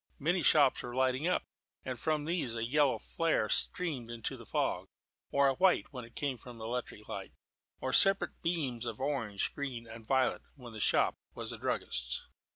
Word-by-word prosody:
Many 175 +5 +1
shops 145 -5 +5
were 120 0 -6
lighting 130 +4 +1
up, 180 - +1 0.4
and 130 -2 -4
from 155 0 0
these 160 -8 0
a 115 0 -1
yellow 140 +2 +3
flare 165 -10 0
streamed 150 -10 +1
into 115 -2 -3
the - - -12
fog; - - -1 0.4
or 140 0 +4
a 135 - +3
white 180 0 +2
when 125 -2 -6
it 115 - -18
came 135 -4 -2
from 120 -2 -11
the 110 - -7
electric 115 -3 -5
light; - - -6 0.5
or 130 - -2
separate 195 0 +5
beams 135 -9 -1
of 115 -2 -5
orange, 130 -8 -1
green, 130 -5 -4
and 115 -1 -11
violet, 130 -1 +2
when 125 -5 -11
the 110 - -7
shop - - +3 0.2
was - - -4
a - - -6
druggist's. - - -1
130 Hz, 185 wpm, -32 LUFS, 115-150 Hz, 0.5 s, shops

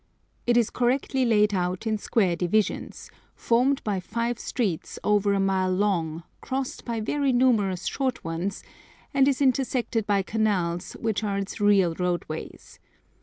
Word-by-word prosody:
It 240 0 +4
is 235 -3 +2
correctly 255 +1 +1
laid 210 -3 +3
out 180 +2 -1
in 215 -1 0
square 195 -5 +1
divisions, 190 +4 -1 0.2
formed 255 +4 +1
by 205 -3 -1
five 235 +5 -3
streets 200 -10 -3
over 205 -1 +2
a 200 - +1
mile 190 -1 +1
long, 175 -5 0 0.2
crossed 265 0 -4
by 235 -2 -2
very 275 +5 0
numerous 220 -8 +2
short 260 -2 -2
ones, 170 +4 -3 0.5
and 275 -1 +4
is 280 0 +2
intersected 250 -4 0
by 200 -2 +2
canals, 190 -5 -1
which 220 -1 -2
are 200 -2 -1
its 200 +1 -5
real 200 -4 +4
roadways. 175 -2 -4
210 Hz, 145 wpm, -26 LUFS, 185-240 Hz, 0.5 s, It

